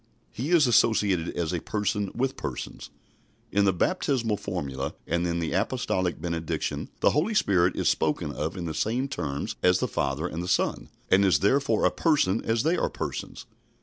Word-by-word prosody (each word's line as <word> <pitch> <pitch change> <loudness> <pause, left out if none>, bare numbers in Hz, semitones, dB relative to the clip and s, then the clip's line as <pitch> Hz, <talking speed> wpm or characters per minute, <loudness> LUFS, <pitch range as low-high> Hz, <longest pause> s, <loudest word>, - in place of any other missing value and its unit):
He 130 +7 -4
is 170 -4 +5
associated 105 -7 +3
as 85 0 -1
a 90 - 0
Person 105 -1 -1
with 130 +2 0
Persons. 65 - -6 0.6
In 100 0 +3
the 95 - +4
baptismal 120 - 0
formula 70 -7 -4
and 85 +1 0
in 85 0 -1
the 85 -1 -2
apostolic 95 -4 0
benediction 80 -1 -3
the - - +5
Holy 175 +10 0
Spirit 95 - +3
is - - 0
spoken - - +1
of 80 +5 -4
in 90 - -4
the 80 - -3
same 120 - 0
terms 75 - -4
as 90 0 +4
the - - -1
Father 70 +4 -1
and 85 -1 -5
the 90 - -4
Son, 90 - 0 0.2
and 95 +1 +6
is 90 -7 +3
therefore 115 +1 +2
a - - +4
Person 140 - +2
as 115 +1 +1
they 165 +4 +2
are - - 0
Persons. - - -5
95 Hz, 180 wpm, -27 LUFS, 85-120 Hz, 0.6 s, and